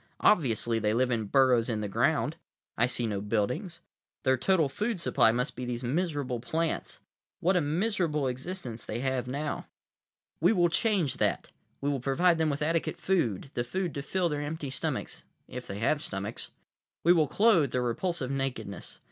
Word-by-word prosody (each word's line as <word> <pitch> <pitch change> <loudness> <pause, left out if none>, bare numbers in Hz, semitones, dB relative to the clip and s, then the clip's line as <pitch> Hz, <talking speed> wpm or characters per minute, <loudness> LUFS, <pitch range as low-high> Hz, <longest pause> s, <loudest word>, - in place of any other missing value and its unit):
Obviously 120 - +3
they 105 0 +1
live 125 +1 +2
in 115 -3 0
burrows 125 0 +4
in 110 -2 -1
the 105 - -2
ground; 100 - +1 0.4
I 120 - +3
see 125 -1 +1
no 105 -3 -2
buildings. 115 - -2 0.4
Their 130 -2 +4
total 165 +3 +2
food 210 - -2
supply 125 -6 +4
must 125 +4 -1
be 125 - -5
these 120 0 -3
miserable 145 -3 -1
plants. 160 +7 -2 0.4
What 185 +3 +2
a 180 - +4
miserable 165 -2 0
existence 130 -2 -5
they 115 +3 -4
have 130 -2 -1
now! 145 +4 -3 0.7
"We 175 +7 +4
will 175 -4 +3
change 185 - +1
that. - - 0 0.3
We 140 - 0
will 140 - -1
provide 165 +7 +2
them 160 -1 +2
with 145 +1 -1
adequate 165 +1 0
food, 135 - 0
the 120 - -1
food 180 +5 -2
to 140 - -3
fill 180 +5 0
their 150 -3 -2
empty 145 -2 -4
stomachs—if 125 -1 -5
they 100 - -5
have 135 +7 +1
stomachs. 100 0 -4 0.5
We 175 - +7
will 160 -4 +3
clothe 190 - +4
their 125 -1 0
repulsive 135 +3 -1
nakedness. 125 -8 -4
135 Hz, 175 wpm, -29 LUFS, 120-170 Hz, 0.7 s, We